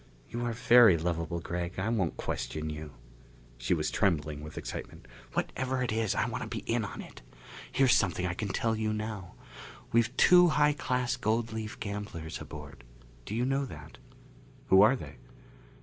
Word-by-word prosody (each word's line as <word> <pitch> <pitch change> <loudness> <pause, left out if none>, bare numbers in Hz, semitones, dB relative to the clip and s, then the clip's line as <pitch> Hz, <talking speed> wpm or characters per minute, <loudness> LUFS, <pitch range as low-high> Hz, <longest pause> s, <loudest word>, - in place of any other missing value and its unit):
"You 120 +1 -3
are 120 - 0
very 120 -5 +7
lovable, 85 0 -2
Gregg. 85 +1 -4
I 95 +3 -1
won't 100 -8 0
question 75 0 -3
you." 75 -1 -7 0.7
She - - +1
was - - -1
trembling 75 -6 0
with 75 +1 -9
excitement. - - -7 0.3
"Whatever 130 0 -1
it 120 - -1
is, 110 -2 0
I - - +1
want - - -4
to - - -5
be - - -4
in - - 0
on - - -6
it. - - -13 0.5
Here's 135 -2 +4
something 90 -2 +2
I 90 - -1
can 105 +3 -3
tell 110 +3 0
you 110 0 -1
now. 105 -4 -5 0.6
We've 115 +2 +2
two 180 0 +7
high 150 -2 +3
class 125 -3 -1
gold 115 +1 0
leaf 110 -1 -5
gamblers 100 -6 -5
aboard. - - -10 0.4
Do 105 - -3
you 120 +2 +1
know 135 +1 +1
that?" 75 - -11 0.7
"Who 95 0 +8
are 110 +6 +6
they?" 70 - -9
105 Hz, 175 wpm, -30 LUFS, 85-120 Hz, 0.7 s, Who